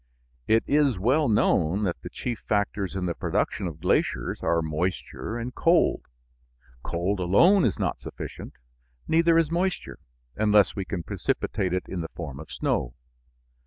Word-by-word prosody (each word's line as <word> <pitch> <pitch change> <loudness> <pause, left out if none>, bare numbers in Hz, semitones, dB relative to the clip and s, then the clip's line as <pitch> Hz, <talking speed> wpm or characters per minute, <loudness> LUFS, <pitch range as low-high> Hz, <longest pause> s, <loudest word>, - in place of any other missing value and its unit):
It 110 +1 +4
is 145 -6 +2
well 130 +9 +2
known 95 -2 +2
that 90 -4 -2
the - - -7
chief 120 -3 -4
factors 100 -2 0
in 95 -1 -2
the 85 - -1
production 95 +3 -1
of 80 -2 -7
glaciers 60 -7 0
are 85 -1 +1
moisture 90 +7 -3
and 120 +2 -5
cold. 170 0 +2 0.7
Cold 90 +7 -2
alone 165 - +5
is 100 - 0
not - - -1
sufficient; - - -8 0.5
neither 165 +1 +4
is 165 -1 +2
moisture, 180 +2 -2 0.4
unless 105 -1 +3
we 100 -3 -3
can 95 -4 -4
precipitate 90 +2 -2
it 90 0 0
in 90 - -4
the 80 - -5
form 75 -6 -6
of 80 - -10
snow. - - -1
100 Hz, 155 wpm, -26 LUFS, 85-125 Hz, 0.7 s, alone